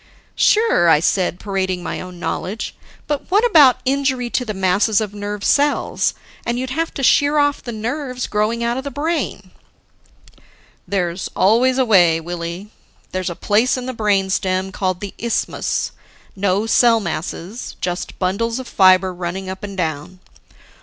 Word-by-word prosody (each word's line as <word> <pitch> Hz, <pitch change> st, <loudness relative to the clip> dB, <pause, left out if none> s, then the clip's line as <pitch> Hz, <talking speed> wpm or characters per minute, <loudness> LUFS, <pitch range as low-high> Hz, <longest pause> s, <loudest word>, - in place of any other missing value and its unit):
"Sure," 425 Hz, -, +3 dB
I 150 Hz, -, +6 dB
said, 180 Hz, +1 st, 0 dB
parading 190 Hz, -3 st, -2 dB
my -, -, -4 dB
own 180 Hz, -1 st, -9 dB
knowledge, 195 Hz, +4 st, -4 dB, 0.3 s
"but 295 Hz, -2 st, -3 dB
what 415 Hz, +5 st, +3 dB
about 300 Hz, -, +6 dB
injury 260 Hz, -2 st, 0 dB
to 250 Hz, -, 0 dB
the 225 Hz, -, -4 dB
masses 195 Hz, +3 st, +2 dB
of 210 Hz, -2 st, -3 dB
nerve 205 Hz, 0 st, -5 dB
cells? 290 Hz, +5 st, +1 dB, 0.3 s
And 235 Hz, +1 st, -2 dB
you'd 260 Hz, +1 st, -3 dB
have 325 Hz, +4 st, -1 dB
to 275 Hz, -, -4 dB
shear 285 Hz, +3 st, +4 dB
off 290 Hz, -1 st, +2 dB
the 240 Hz, -, -6 dB
nerves 250 Hz, +3 st, -3 dB
growing 215 Hz, +3 st, -1 dB
out 235 Hz, +1 st, 0 dB
of 265 Hz, -, -4 dB
the 280 Hz, -, -4 dB
brain." 290 Hz, -, -3 dB, 1.4 s
"There's 180 Hz, -2 st, -2 dB
always 240 Hz, +7 st, +3 dB
a 260 Hz, -, +3 dB
way, 175 Hz, -7 st, +5 dB
Willie. 175 Hz, +4 st, -6 dB, 0.4 s
There's 185 Hz, -1 st, -2 dB
a 175 Hz, -, -5 dB
place 220 Hz, +8 st, +2 dB
in 250 Hz, -, -5 dB
the 255 Hz, -, -4 dB
brain 200 Hz, -4 st, +1 dB
stem 190 Hz, 0 st, -1 dB
called 185 Hz, -2 st, -2 dB
the 200 Hz, -2 st, -6 dB
isthmus, 235 Hz, -1 st, -1 dB, 0.4 s
no 200 Hz, +1 st, +1 dB
cell 230 Hz, 0 st, +4 dB
masses, 180 Hz, +4 st, -5 dB
just 175 Hz, 0 st, -4 dB
bundles 215 Hz, +6 st, -1 dB
of 260 Hz, -2 st, -6 dB
fibers 185 Hz, -1 st, +4 dB
running 185 Hz, +2 st, -4 dB
up 190 Hz, +2 st, -9 dB
and 200 Hz, -1 st, -6 dB
down. 160 Hz, +1 st, -3 dB
205 Hz, 160 wpm, -19 LUFS, 185-255 Hz, 1.4 s, I